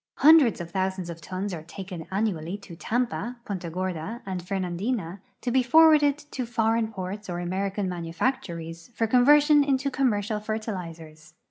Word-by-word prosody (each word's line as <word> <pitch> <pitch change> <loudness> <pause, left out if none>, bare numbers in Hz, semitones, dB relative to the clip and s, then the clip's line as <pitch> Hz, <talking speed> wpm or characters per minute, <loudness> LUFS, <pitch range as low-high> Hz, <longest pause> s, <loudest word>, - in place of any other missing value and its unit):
Hundreds 295 -8 +6
of 170 -1 -7
thousands 190 -2 -2
of 165 0 -10
tons 185 +4 -4
are 165 - -5
taken 175 0 -8
annually 190 -3 -1
te 195 -4 -12
Tampa, 240 +4 -2
Punta 185 -4 -4
Gorda, 185 +5 -4
and 185 -2 -4
Fernandina 185 +1 -3 0.2
to 245 - -2
be 260 +1 +4
forwarded 295 +1 +5
to 255 -3 -3
foreign 225 -1 +1
j)orts 195 +1 -6
or 175 - -3
American 190 +2 -2
manufactories 170 -2 -3
for 225 - +1
conversion 290 +5 +5
into 275 0 0
commercial 215 -5 0
fertilizers. 165 -8 -6
195 Hz, 145 wpm, -26 LUFS, 175-240 Hz, 0.2 s, Hundreds